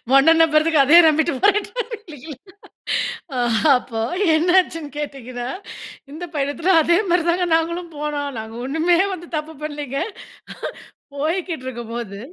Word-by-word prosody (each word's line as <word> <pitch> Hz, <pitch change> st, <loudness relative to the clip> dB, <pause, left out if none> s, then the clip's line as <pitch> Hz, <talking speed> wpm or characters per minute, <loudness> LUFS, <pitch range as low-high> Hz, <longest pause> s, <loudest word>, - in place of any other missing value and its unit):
உன்ன 305 Hz, +4 st, +7 dB
நம்பறதுக்கு 310 Hz, -1 st, +3 dB
அதே 320 Hz, +5 st, +7 dB
நம்பிட்டு 315 Hz, 0 st, +3 dB
போயிடுறேன். 420 Hz, +4 st, +1 dB, 0.2 s
இல்லிங்களா. 300 Hz, +6 st, -12 dB, 1.2 s
அப்போ 230 Hz, -2 st, -4 dB, 0.3 s
என்னாச்சுன்னு 330 Hz, -2 st, +2 dB
கேட்டிங்கனா, 255 Hz, -4 st, -5 dB, 0.7 s
இந்த 340 Hz, +4 st, -6 dB
பயணத்துல 290 Hz, +6 st, 0 dB
அதே 340 Hz, +2 st, +3 dB
மாதிரி 345 Hz, -1 st, +2 dB
தாங்க 355 Hz, +1 st, +2 dB
நாங்களும் 335 Hz, +1 st, -1 dB
போனோம். 295 Hz, -1 st, -3 dB
நாங்க 220 Hz, +1 st, -7 dB
ஒண்ணுமே 320 Hz, +6 st, +2 dB, 0.2 s
வந்து 345 Hz, -2 st, -7 dB
தப்பு 305 Hz, +1 st, -4 dB
பண்ணலைங்க 290 Hz, -3 st, -4 dB, 1.2 s
போயிட்டு 325 Hz, -1 st, -2 dB
இருக்கும்போது. 235 Hz, -4 st, -6 dB
310 Hz, 110 wpm, -21 LUFS, 275-340 Hz, 1.2 s, உன்ன